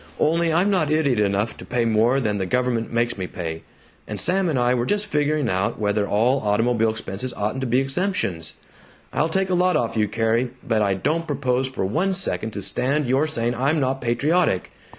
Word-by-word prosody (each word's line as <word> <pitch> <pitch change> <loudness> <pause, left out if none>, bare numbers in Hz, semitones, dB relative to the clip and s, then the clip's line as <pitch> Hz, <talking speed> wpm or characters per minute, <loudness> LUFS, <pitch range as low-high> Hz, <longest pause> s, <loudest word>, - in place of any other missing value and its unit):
Only, 165 +2 +2
I'm 180 +5 +2
not 180 -6 +1
idiot 145 -7 +2
enough 105 +2 0
to - - -10
pay 120 -1 -1
more 115 +4 +3
than 105 -5 -1
the 95 - -2
government 125 0 0
makes 120 -2 0
me 95 - -3
pay, 80 -4 -5 0.5
and - - -4
Sam 185 0 +2
and 150 - 0
I 125 0 +2
were 120 -1 0
just 205 0 +1
figuring 150 -6 0
out 95 0 0
whether 105 -1 0
all 120 +6 +2
automobile 115 +2 +1
expenses 110 +2 -5
oughn't 105 +6 -2
to 130 - -1
be 125 +2 +2
exemptions. 135 - -2 0.6
I'll 160 - +1
take 190 +2 0
a - - +2
lot 180 -2 +3
off 115 -4 -2
you, 110 -1 +2
Carrie, 115 +3 0 0.2
but 110 -2 +2
I 100 -2 +2
don't 160 - -1
propose 130 -3 0
for 130 -7 -3
one 180 - 0
second 185 - +1
to 100 - -5
stand 140 +8 0
your 135 +5 +2
saying 120 -5 -1
I'm 140 +6 +1
not 135 -1 -1
patriotic. 140 - +1
125 Hz, 205 wpm, -23 LUFS, 110-155 Hz, 0.6 s, more